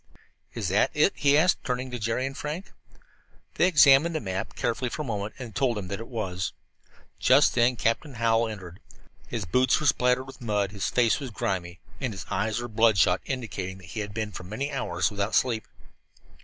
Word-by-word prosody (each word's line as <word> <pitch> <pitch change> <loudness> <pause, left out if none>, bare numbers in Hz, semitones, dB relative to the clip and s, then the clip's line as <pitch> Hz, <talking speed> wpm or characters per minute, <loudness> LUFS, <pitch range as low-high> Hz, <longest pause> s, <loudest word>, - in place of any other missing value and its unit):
"Is - - -2
that - - +3
it?" - - +4
he 145 0 +4
asked, 180 +4 +3
turning 125 0 -3
to 125 - -4
Jerry 115 +4 -1
and 135 0 -5
Frank. 155 +7 -5 0.8
They 175 - +3
examined 150 0 +6
the - - +1
map 95 -3 -4
carefully 120 +2 -1
for 150 - -4
a - - -8
moment 105 -3 -4
and 125 -3 -7
then - - -17
told 120 +1 +1
him 95 -3 -5
that 100 - -4
it 115 - -7
was. 95 -7 -3 0.7
Just 135 +4 +5
then 125 +1 +3
Captain 120 +5 -1
Hallowell 115 0 +2
entered. 95 -4 -9 0.5
His 115 -5 -4
boots 125 +8 +3
were 150 - -3
spattered 125 -2 +3
with 135 -1 -12
mud, 105 -4 0
his 100 -2 -3
face 120 -1 +2
was 135 -3 -5
grimy, 90 -4 -3 0.2
and 125 -5 -2
his 95 - -7
eyes 110 +2 0
were 120 - -4
bloodshot, 105 -5 +3
indicating 105 -8 -4
that 90 -2 -13
he - - -4
had 105 -1 -4
been 110 0 -3
for 90 - -8
many 115 +10 -4
hours 90 - -1
without 100 +1 -1
sleep. 115 -4 +1
115 Hz, 200 wpm, -27 LUFS, 100-130 Hz, 0.8 s, examined